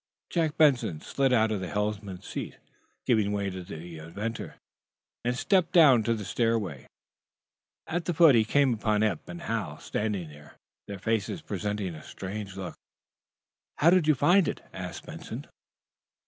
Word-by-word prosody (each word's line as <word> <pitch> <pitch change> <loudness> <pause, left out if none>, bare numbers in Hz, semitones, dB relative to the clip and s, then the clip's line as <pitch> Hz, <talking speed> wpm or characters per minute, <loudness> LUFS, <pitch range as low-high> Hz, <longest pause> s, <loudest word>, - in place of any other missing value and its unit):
Jack 160 -3 0
Benson 130 - +3
slid 135 - 0
out 110 -3 +3
of 105 - -1
the 95 - -4
helmsman's 105 -2 -3
seat, - - -5 0.5
giving 110 -4 +2
way 100 -1 -1
to 95 0 -6
the 85 -1 -8
inventor, 100 +9 -5 0.7
and 125 +1 0
stepped 185 +3 +2
down 140 -9 +7
the 110 -2 -1
stairway. 110 - -1 1.0
At 175 +1 -2
the 175 - 0
foot 165 -3 +7
he 115 -2 +5
came 135 +3 +3
upon 110 -1 +1
Eph 100 -8 -1
and 175 0 -8
Hal, 110 - -3
standing 100 -6 -2
there, 75 0 -15 0.3
their 100 - -6
faces 110 - -1
presenting 100 - -3
a 80 - -9
strange 100 0 -7
look. 95 -3 -5 1.0
"How 165 +3 +5
do 185 0 +6
you 155 -1 +4
find 175 +7 +4
it?" - - -3
asked - - -7
Benson. - - -7
110 Hz, 155 wpm, -28 LUFS, 95-135 Hz, 1.0 s, down